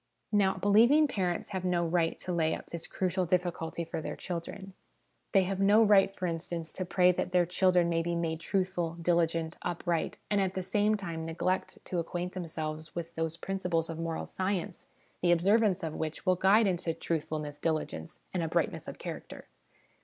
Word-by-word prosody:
Now, 200 -2 +3
believing 230 +11 +5
parents 180 -8 -2
have 190 -3 -3
no 175 -2 +1
right 165 0 +1
to 185 - -5
lay 160 -2 +1
up - - -11
this 170 -1 -5
crucial 185 -1 -1
difficulty 170 -2 -1
for 160 -1 -4
their - - -4
children. 190 +2 -6 0.6
They 195 -2 +5
have 190 +1 -2
no 205 +3 +6
right, 200 -2 +5
for 190 -1 -5
instance, 165 -1 -4
to 185 - -3
pray 180 0 +4
that 180 0 -2
their 180 -1 +4
children 180 0 +3
may 165 -1 +1
be 170 +1 -1
made 165 -1 -1
truthful, 180 -2 -1
diligent, 165 -1 +1
upright, 175 -1 -1
and 205 -1 +3
at 190 -1 -1
the 185 - -2
same 210 +3 +2
time 170 -5 -5
neglect 170 +3 -1
to 180 - -2
acquaint 175 +2 -3
themselves 155 -3 -5
with 170 -1 -5
those 165 0 -2
principles 175 -4 -1
of 165 - -6
moral 165 -1 -3
science 185 -1 -3 0.3
the 175 - +3
observance 195 +2 +3
of 160 -2 -2
which 160 +3 -4
will 185 -1 +4
guide 195 +5 +5
into 175 -4 0
truthfulness, 155 -3 -3
diligence, 155 - -3
and 180 - 0
uprightness 165 -1 -1
of - - -7
char - - -5
acter. - - -11
175 Hz, 185 wpm, -30 LUFS, 165-190 Hz, 0.6 s, no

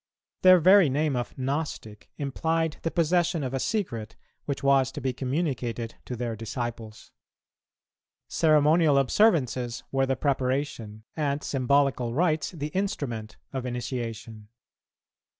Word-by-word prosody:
Their 185 0 +8
very 185 -1 +6
name 145 +1 0
of 120 -1 -4
"Gnostic" 135 -6 -4
implied 160 +3 -1
the 165 - -1
possession 170 -1 +1
of 130 0 -4
a 135 - -1
secret, 120 - -3 0.3
which 140 -1 -4
was 135 -1 +3
to - - -5
be 130 0 -2
communicated 125 -4 -2
to 125 - -5
their 120 -1 -3
disciples. 115 0 -6 1.2
Ceremonial 155 -1 +4
observances 130 - +2
were 135 0 +1
the 135 - +1
preparation, 130 -6 -2
and 145 -2 -1
symbolical 135 -2 +1
rites 155 -2 +1
the 150 -4 -5
instrument, 140 - -3 0.2
of 130 -2 -3
initiation. 115 -3 -5
135 Hz, 120 wpm, -26 LUFS, 120-155 Hz, 1.2 s, Their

